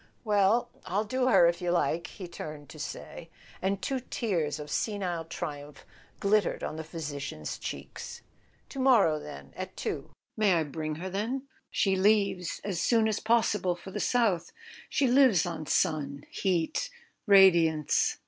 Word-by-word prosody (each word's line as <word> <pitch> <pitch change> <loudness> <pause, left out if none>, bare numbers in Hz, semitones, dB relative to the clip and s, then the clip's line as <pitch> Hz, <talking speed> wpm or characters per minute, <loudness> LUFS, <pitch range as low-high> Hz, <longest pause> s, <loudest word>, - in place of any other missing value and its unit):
"Well, 210 +1 +2 0.2
I'll 200 +4 0
do 255 +4 0
her, 235 - +6
if 170 +1 +1
you 175 - -1
like," 170 -1 +1
he 185 - -9
turned 150 -4 -8
to 155 - -11
say; 165 +3 -7 0.3
and 195 +1 -1
two 270 -1 -1
tears 180 - -2
of 150 -1 -8
senile 185 -6 -2
triumph 150 -3 -7 0.3
glittered 205 -1 +1
on - - -3
the 160 - -5
physi¬ 155 -3 -6
cian's 75 - -5
cheeks. - - -7 0.5
"To 275 - -7
morrow, 220 -13 +4
then—at 70 - -9
two—may 205 -4 -1
I 165 - +2
bring 155 +1 -4
her? 200 - -3 0.3
She 195 -1 +1
leaves 200 -2 +2
as 190 -4 -2
soon 225 -2 +3
as 215 -1 0
possible 215 -5 +2
for 175 +2 -11
the - - -4
south. 220 -9 +1 0.4
She 285 - +2
lives 250 - +5
on 160 -3 -5
sun, 145 -5 0
heat, 185 - 0 0.4
radiance. 170 -6 +5
180 Hz, 150 wpm, -29 LUFS, 160-210 Hz, 0.5 s, her